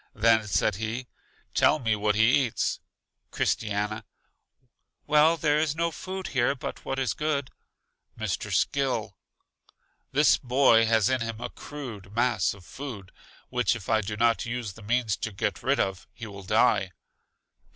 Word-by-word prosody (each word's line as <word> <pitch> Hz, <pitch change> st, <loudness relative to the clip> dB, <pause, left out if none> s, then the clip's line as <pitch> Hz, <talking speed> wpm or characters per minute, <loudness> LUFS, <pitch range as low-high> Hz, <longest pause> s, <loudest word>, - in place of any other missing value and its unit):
Then 110 Hz, 0 st, +3 dB
said 105 Hz, -1 st, +1 dB
he: 115 Hz, +4 st, -3 dB, 0.5 s
Tell -, -, +4 dB
me 115 Hz, -6 st, 0 dB
what 105 Hz, 0 st, +1 dB
he 120 Hz, +5 st, +4 dB
eats. 115 Hz, -, -2 dB, 0.5 s
Christiana: 105 Hz, +1 st, -1 dB, 1.0 s
Well, 150 Hz, +2 st, +4 dB
there 150 Hz, -1 st, +2 dB
is 155 Hz, -1 st, 0 dB
no 170 Hz, +1 st, 0 dB
food 190 Hz, +2 st, -6 dB
here 130 Hz, +1 st, +1 dB
but 130 Hz, -, -7 dB
what 135 Hz, -, -3 dB
is 130 Hz, -4 st, 0 dB
good. 150 Hz, -3 st, -2 dB, 0.7 s
Mr. -, -, -3 dB
Skill: 125 Hz, -7 st, 0 dB, 1.0 s
This 145 Hz, +2 st, +4 dB
boy 125 Hz, -3 st, +4 dB
has 110 Hz, -1 st, +3 dB
in 130 Hz, -2 st, +1 dB
him 115 Hz, -1 st, -4 dB
a -, -, -5 dB
crude 110 Hz, -9 st, -9 dB
mass 120 Hz, -6 st, +1 dB
of 95 Hz, -3 st, -16 dB
food, 120 Hz, -8 st, -8 dB, 0.4 s
which 125 Hz, -3 st, +1 dB
if 110 Hz, -4 st, -8 dB
I 110 Hz, -1 st, +3 dB
do 105 Hz, +1 st, -5 dB
not 115 Hz, 0 st, +2 dB
use 120 Hz, -4 st, -4 dB
the 110 Hz, -, -14 dB
means 110 Hz, 0 st, 0 dB
to 110 Hz, -, -4 dB
get 95 Hz, -, -2 dB
rid -, -, +1 dB
of, 95 Hz, -1 st, -2 dB
he 115 Hz, -, -8 dB
will 100 Hz, -2 st, -9 dB
die. 95 Hz, -, +2 dB
115 Hz, 155 wpm, -27 LUFS, 105-135 Hz, 1.0 s, Tell